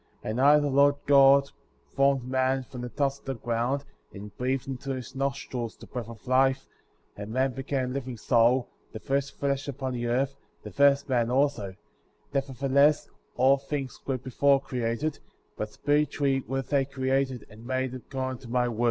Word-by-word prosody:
7. - - -3
And 120 +4 -1
I, 145 +2 +7
the 145 -1 +1
Lord 140 +1 +4
God, 140 0 +6 0.4
formed 135 -1 +3
man 130 0 +1
from 125 -1 -9
the 125 - -5
dust 140 +1 -1
of - - -31
the 135 0 -3
ground,® 120 +4 -1 0.3
and 105 +1 -10
breathed 130 +2 -1
into 135 0 -4
his 130 -1 -8
nostrils 135 -4 -3
the - - -12
breath 120 -3 -6
of 115 -2 -12
life;^ 130 +1 +3 0.5
and 105 +1 -7
man 130 +2 +1
became 135 -1 -2
a - - -4
living 130 -3 -4
soul,^ 120 +2 +3 0.3
the 110 - -6
first 140 +3 -2
flesh 140 0 -1
upon 130 -1 -4
the 120 -1 -2
earth, 135 +3 0 0.3
the - - -8
first 140 0 +4
man^ 120 -3 +1
also; 125 -8 0 0.6
nevertheless, 140 +2 +2 0.3
all 135 +2 +5
things 135 -1 -5
were 135 -1 0
before 135 +2 +2
created; 125 +3 -2 0.4
but 105 0 -4
spiritually 145 -2 +1
were 135 0 -2
they 140 0 +1
created 130 -2 -1
and 110 0 -14
made 130 -1 -1
according 130 0 -5
to 125 - -11
my 125 0 +1
word. 115 -2 -5
135 Hz, 180 wpm, -27 LUFS, 125-140 Hz, 0.6 s, I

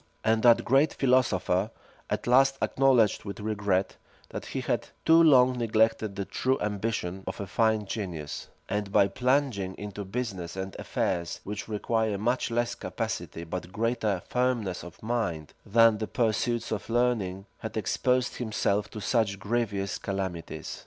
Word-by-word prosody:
And 110 0 +2
that 120 -1 +5
great 135 +5 +3
philosopher 110 -7 +2 0.4
at - - -2
last 135 +2 +4
acknowledged 130 -5 +3
with 100 0 -6
regret, 100 -3 -1 0.3
that - - -6
he - - -3
had - - -1 0.2
too 165 +1 +7
long 130 -5 +5
neglected 110 -2 +1
the 100 -1 -3
true 130 +6 0
ambition 100 -3 -2
of - - -4
a 100 - -3
fine 110 +1 +1
genius; 90 -8 -5 0.2
and 105 0 -2
by 100 - +5
plunging 125 -5 0
into 105 0 -6
business 95 -5 -4
and 95 0 -5
affairs, 85 -2 -2
which 105 0 -5
require 110 0 0
much 120 +6 0
less 120 0 0
capacity, 85 - -4
but 85 +1 -6
greater 110 -3 -1
firmness 125 -7 0
of 90 +2 -12
mind, 110 -10 -2
than 115 0 +5
the 110 - -2
pursuits 120 0 0
of 110 -1 -3
learning, 115 -6 0
had 110 0 -6
exposed 125 +4 0
himself 105 -3 0
to 110 - -7
such 110 -3 +1
grievous 100 -2 -2
calamities. 95 -4 -4
110 Hz, 145 wpm, -28 LUFS, 95-120 Hz, 0.4 s, too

